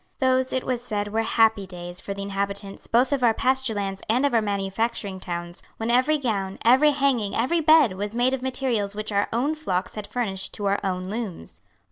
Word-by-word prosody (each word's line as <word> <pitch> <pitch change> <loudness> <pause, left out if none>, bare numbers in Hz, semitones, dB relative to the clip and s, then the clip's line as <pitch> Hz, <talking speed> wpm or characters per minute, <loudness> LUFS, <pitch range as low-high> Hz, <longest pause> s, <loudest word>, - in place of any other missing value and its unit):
Those, 260 -1 +2
it 260 - -1
was 245 -2 -2
said, 205 -3 -3
were 220 +2 0
happy 220 -3 +2
days 175 -1 -5
for 200 - -5
the 200 - -5
inhabitants 200 0 -3
both 250 +4 +3
of 275 - 0
our 230 -2 +4
pasture 260 -3 +1
lands 195 -1 -3
and 250 +5 +3
of 280 - +1
our 230 - +4
manufacturing 200 0 -2
towns, 175 -1 -5 0.2
when 225 +1 -1
every 260 +6 +3
gown, 200 -8 -2
every 260 +6 +6
hanging, 270 -8 +1
every 300 +9 +1
bed, 310 - +5
was 205 +3 -4
made 245 +2 +2
of 265 - -2
materials 250 -6 -1
which 215 +1 -3
our 200 0 +1
own 255 +7 0
flocks 190 -13 -2
had 210 -1 -6
furnished 195 -6 -2
to 205 - -5
our 200 0 +1
own 185 -1 -2
looms. 200 - -6
220 Hz, 205 wpm, -24 LUFS, 195-255 Hz, 0.2 s, every